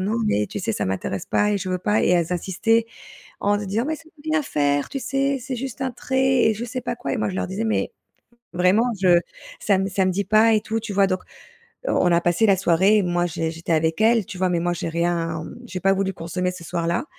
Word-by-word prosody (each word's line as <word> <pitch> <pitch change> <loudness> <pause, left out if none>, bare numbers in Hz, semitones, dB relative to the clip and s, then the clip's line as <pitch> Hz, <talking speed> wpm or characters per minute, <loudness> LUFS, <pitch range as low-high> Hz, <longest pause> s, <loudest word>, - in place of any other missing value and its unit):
«Non, 205 +4 -1
mais 105 - +1
tu - - -5
sais, - - -1
ça - - -2
m'intéresse 95 0 -3
pas 210 - +2
et 205 - +1
je 185 0 -5
veux 185 - -1
pas» 210 +4 +1
et - - +2
elles 175 -1 +2
insistaient 220 +6 +1 0.5
en 205 0 +1
se 205 - -5
disant: 215 +6 -1
«Mais 315 - -1
ça 325 - -15
peut 320 -2 -20
rien 315 -1 +2
faire, 145 - 0
tu 275 - -4
sais, 275 +2 0
c'est 255 0 -4
juste 265 +1 -6
un 260 -1 -1
trait» 265 +1 +1
et 220 - +4
je 235 - -4
sais 250 +1 -5
pas 240 - -3
quoi 245 +2 -4
et 255 - -2
moi 215 - 0
je 185 - -5
leur - - -1
disais: 195 +4 -3
«Mais 220 - 0 0.6
vraiment, 185 +6 +3 0.2
je 175 -2 +6 0.4
ça 200 -2 +2
me 195 - 0
ça 190 0 +1
me 185 - +2
dit 200 +3 -1
pas 215 +3 +5
et 215 - +3
tout», 225 +1 -2
tu 220 -1 -6
vois? 200 0 +4
Donc, 185 -1 -1 0.7
heu, - - +1
on 180 - +3
a 170 - +4
passé 175 +6 +2
la 195 -3 +4
soirée, 190 +4 +3
moi, 175 -1 0
j'é 165 -1 -2
j'étais 165 +1 -6
avec 160 +4 +1
elles, 225 -2 +4
tu 185 - -8
vois? 185 0 +1
Mais 175 - +1
moi, 175 +1 0
j'ai 170 - -4
rien 165 -1 -1
mmh, - - -10
j'ai 185 -2 -5
pas 195 0 +4
voulu 195 0 0
consommer 180 +2 -3
ce 180 -2 -10
soir-là 170 - -1
190 Hz, 265 wpm, -23 LUFS, 175-225 Hz, 0.7 s, je